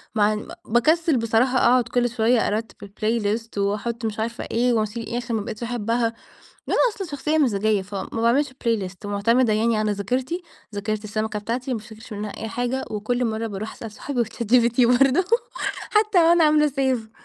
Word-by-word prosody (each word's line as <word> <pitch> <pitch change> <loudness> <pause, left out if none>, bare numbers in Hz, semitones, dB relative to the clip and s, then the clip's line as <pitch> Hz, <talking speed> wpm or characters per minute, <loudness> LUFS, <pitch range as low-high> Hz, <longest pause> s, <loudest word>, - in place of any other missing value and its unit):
مع 210 0 +3
ن 210 - -5 0.2
باكسل 310 +6 +3
بصراحة 230 +3 +2
أقعد 250 0 +4
كل 245 +1 +1
شوية 230 0 +2
أرتب 220 +2 -3
الplaylist 215 +1 -2
وأحط 210 +4 -1
مش 220 -1 -3
عارفة 230 +2 -3
إيه، 245 +2 +2
واشيل 225 +1 -1
إيه 240 - -3
عشان 240 -1 -3
ما 215 - 0
بقيتش 215 +2 -6
أحبها. 235 0 0 0.6
ده - - +1
أنا - - +2 0.2
أصلًا 390 - -5
شخصية 300 +2 -1
مزاجية 215 -6 +2
فما 195 0 -6
باعملش 265 +5 +3 0.2
playlist 195 -6 -1
ومعتمدة 220 +4 +2
يعني 225 +2 +2
على 215 -1 +1
ذاكرتي، 250 - -2 0.3
ذاكرة 215 +1 -3
السمكة 215 +1 -2
بتاعتي، 240 +5 -3
ما 235 - -1
بافتكرش 220 +1 -12
منها 210 0 -4
أي 225 - -5
حاجة، 245 +3 -2
وكل 230 +4 -1
مرة 225 0 -1
باروح 215 0 -5
أسأل 225 - -8
صحابي 245 +2 -2
وChatGPT 235 +2 +2 0.2
برضه 275 +7 +4 0.7
حتى 425 -2 +3
وأنا 335 0 +5
عاملة 300 0 +4
Save 260 -5 -1
230 Hz, 175 wpm, -23 LUFS, 215-250 Hz, 0.7 s, وأنا